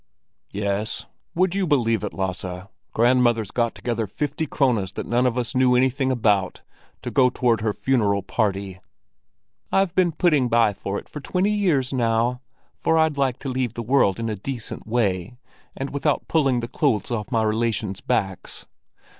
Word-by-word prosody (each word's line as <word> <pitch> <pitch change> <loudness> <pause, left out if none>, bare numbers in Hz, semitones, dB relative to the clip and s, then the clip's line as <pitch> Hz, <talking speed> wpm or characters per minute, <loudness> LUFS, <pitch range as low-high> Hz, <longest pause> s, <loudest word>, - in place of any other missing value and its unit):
"Yes, 100 +1 -2 0.3
would 185 +1 +2
you 195 -2 0
believe 115 -7 +2
it, 105 - -3
Lasse—grandmother's 100 +5 0
got 120 -1 0
together 115 -3 -2
fifty 150 - -3
krones 115 -10 +1
that - - -5
none 125 +2 +2
of 125 0 -1
us 120 -2 -2
knew 125 -1 +4
anything 130 +1 +2
about, 105 -6 +1 0.4
to - - -4
go 130 -2 +4
toward 120 -3 +1
her 110 -1 +1
funeral 105 -5 +1
party!" 100 -3 -2 0.9
"I've 195 -3 +2
been 185 -2 +3
putting 150 -6 +2
by 115 -3 +3
for 100 +1 -4
it - - -8
for 150 - -8
twenty 185 +7 0
years 165 -11 +1
now, 120 0 +1 0.3
for 160 - +1
I'd 160 -3 +2
like 130 -3 +1
to 135 - -4
leave 125 -3 -2
the 120 - -4
world 115 -5 +2
in 115 - -2
a 110 - -1
decent 115 +2 -6
way, 110 -1 -1 0.4
and 135 +1 -4
without 145 +1 -1
pulling 135 -6 +2
the 115 - -4
clothes 125 -4 0
off 115 +2 -3
my 115 -2 +2
relations' 110 -3 -1
backs. 95 -2 -2
120 Hz, 165 wpm, -23 LUFS, 105-135 Hz, 0.9 s, knew